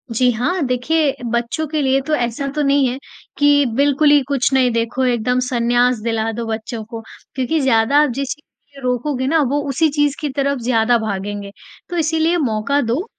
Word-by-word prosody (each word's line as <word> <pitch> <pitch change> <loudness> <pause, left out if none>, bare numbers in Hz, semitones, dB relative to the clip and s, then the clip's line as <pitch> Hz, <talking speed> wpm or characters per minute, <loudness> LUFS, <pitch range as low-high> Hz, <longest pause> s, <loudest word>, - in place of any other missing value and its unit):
जी, 250 +2 +3
हाँ। 250 +10 -1
देखिए 275 +4 0 0.2
बच्चों 235 +6 -1
के 305 0 -1
लिए 270 0 +2
तो 310 - 0
ऐसा 245 +1 -2
तो 300 - 0
नहीं 275 -1 +3
है 250 +2 -3 0.4
कि 290 -1 +4
बिल्कुल 285 +2 +3
ही 290 -1 +5
कुछ 275 -2 0
नहीं 255 -2 +3
देखो, 230 +3 -1
एकदम 250 0 +1
सन्यास 245 0 +2
दिला 225 0 -1
दो 230 +1 -5
बच्चों 220 0 -4
को। 225 +1 -8 0.3
क्योंकि 270 +5 0
ज़्यादा 265 +4 +3
जिस 275 0 -3
चीज़ 285 -1 -21
को 255 - -3
रोकोगे 255 +1 -1
ना 320 +2 +3
वो 290 +1 0
उसी 290 +4 +2
चीज़ 290 -1 +1
की 300 - -3
तरफ 280 -1 0
ज़्यादा 235 0 +2
भागेंगे। 205 -1 -4 0.4
तो 350 - -4
इसीलिए 320 +2 +1
मौका 255 0 0
दो, 245 - -1
260 Hz, 185 wpm, -18 LUFS, 235-290 Hz, 0.4 s, ही